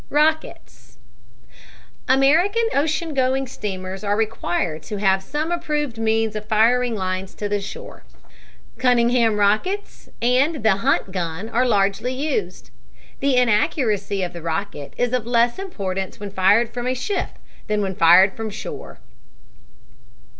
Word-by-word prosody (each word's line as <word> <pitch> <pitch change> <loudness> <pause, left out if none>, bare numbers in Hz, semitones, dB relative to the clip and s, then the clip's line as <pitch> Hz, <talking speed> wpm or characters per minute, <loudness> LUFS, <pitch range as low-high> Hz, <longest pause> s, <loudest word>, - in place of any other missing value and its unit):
ROCKETS 310 +2 -1 1.1
American 325 - +3
ocean 310 +2 0
going 265 0 +1
steamers 190 -5 -6
are 205 0 +1
required 175 -7 -2
to 205 +7 -6
have 195 -1 +2
some 300 - -3
approved 300 -8 -2
means 225 -1 0
of 215 0 -6
firing 235 +2 +3
lines 185 -1 -4
to 210 - -3
the 205 0 -1
shore. 195 - -9 0.8
Cunningham 240 -3 +3
rockets 215 - -1
and 255 +4 +1
the 215 -3 +3
Hunt 195 -1 0
gun 180 +2 -4
are 250 +2 +1
largely 205 +3 +1
used. 310 - -3 0.5
The 275 -1 +1
inaccuracy 210 - +1
of 180 - -4
the 170 - -8
rocket 165 -2 -4
is 245 0 0
of 245 -3 -1
less 240 +4 +2
importance 195 - -4
when 205 -1 -6
fired 205 +5 +3
from 245 0 -3
a 255 - 0
ship 380 +11 -3 0.3
than 210 -1 0
when 190 -1 -2
fired 185 +3 +6
from 225 -1 -4
shore. 210 - -8
225 Hz, 135 wpm, -21 LUFS, 195-260 Hz, 1.1 s, fired